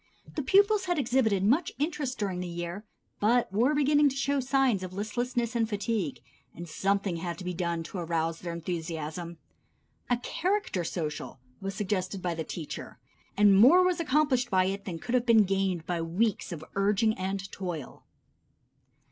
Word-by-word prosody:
The 300 - -2
pupils 400 +6 +4
had 350 -2 0
exhibited 230 -7 +2
much 280 - +2
interest 290 -4 -2
during 190 -4 -2
the 180 - -3
year, 175 +3 -5 0.4
but 230 -1 +2
were 245 +8 +3
beginning 290 0 +4
to 270 - -6
show 275 +1 0
signs 260 -5 +2
of 185 -1 -6
listlessness 240 +4 -2
and 225 -2 +1
fatigue, 205 - -2 0.3
and 175 +1 -7
something 195 +2 0
had 170 0 -4
to - - -8
be 180 0 -3
done 170 -1 -2
to 180 +3 -6
arouse 165 -1 -1
their 175 - -5
enthusiasm. 170 0 -5 0.7
A 245 - +3
character 340 - -1
social 155 -5 -4 0.2
was 195 0 -4
suggested 190 -1 -2
by 175 -1 -2
the 165 -1 -3
teacher, 155 -1 -7 0.4
and 205 -1 +6
more 275 - +7
was 365 -1 +1
accomplished 295 -5 +2
by 185 -1 +3
it 195 +1 -3
than 175 -4 -4
could 240 +8 -5
have 250 -1 +2
been 225 -2 +7
gained 190 -3 0
by 175 -2 -2
weeks 185 +7 0
of 160 -2 -6
urging 205 +2 +2
and 195 +1 -4
toil. 175 -7 -6
200 Hz, 170 wpm, -29 LUFS, 175-250 Hz, 0.7 s, more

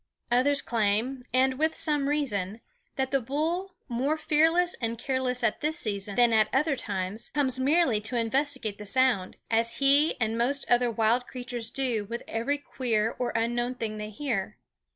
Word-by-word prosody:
Others 275 +4 +3
claim, 230 +3 0
and 260 +1 +2
with 315 +1 +1
some 295 -4 +1
reason, 220 -9 -1 0.4
that 265 -1 -1
the 275 -1 +2
bull, 330 +9 -2
more 270 +5 0
fearless 325 +3 +2
and 230 0 -2
careless 250 0 -1
at 220 - 0
this 310 +2 0
season 200 - -2
than 240 -1 +5
at 215 -1 +4
other 280 +2 +2
times, 200 -2 -4
comes 260 -3 +1
merely 270 -5 +3
to 225 +4 -4
investigate 235 -2 0
the 210 - -8
sound, 240 -5 +2 0.2
as 230 +1 +2
he 285 +3 +4
and 225 -1 0
most 275 +4 0
other 245 0 +3
wild 230 +2 +1
creatures 245 -3 -5
do 240 -6 -1
with 235 +3 -6
every 235 +6 -1
queer 230 -6 -1
or 245 - 0
unknown 240 +2 0
thing 220 -3 -4
they 210 0 -5
hear. 215 -4 -3
245 Hz, 170 wpm, -27 LUFS, 225-280 Hz, 0.4 s, than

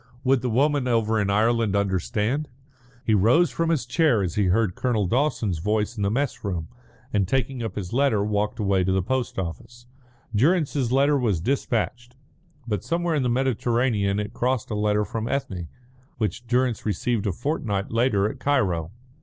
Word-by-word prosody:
Would 130 -1 +3
the 125 - -1
woman 140 +3 +2
over 110 -2 +1
in 100 - 0
Ireland 110 0 +2
understand? 105 - 0 0.6
He 110 - +2
rose 115 - +4
from 165 0 -1
his 155 -7 +1
chair 130 - +2
as 85 -3 -2
he 105 - +1
heard 95 +1 +2
Colonel 115 -3 0
Dawson's 115 - 0
voice 105 +5 -1
in 105 - -5
the 100 - +2
mess 135 +6 -2
room, 90 -6 -3 0.4
and 100 -3 +2
taking 130 +2 -1
up 115 - -4
his 95 -2 -5
letter, 125 -6 +2
walked 105 +2 -1
away 100 -4 +1
to 95 - 0
the 95 -1 +1
post 130 +4 -2
office. 120 +7 -6 0.5
Durrance's 140 - +2
letter 140 +2 +3
was 105 -9 +1
despatched, 120 +1 -2 0.5
but 105 -5 -2
somewhere 170 0 -1
in 150 - +1
the 125 - 0
Mediterranean 120 -5 +1
it 105 -1 -4
crossed 125 -2 -1
a - - -1
letter 105 0 +1
from 115 -1 -4
Ethne, 95 -12 -3 0.5
which 115 +2 -3
Durrance 125 -1 +1
received 110 +1 -1
a - - +1
fortnight 105 - -2
later 115 -4 +2
at - - -6
Cairo. 95 - +1
115 Hz, 175 wpm, -24 LUFS, 100-130 Hz, 0.6 s, rose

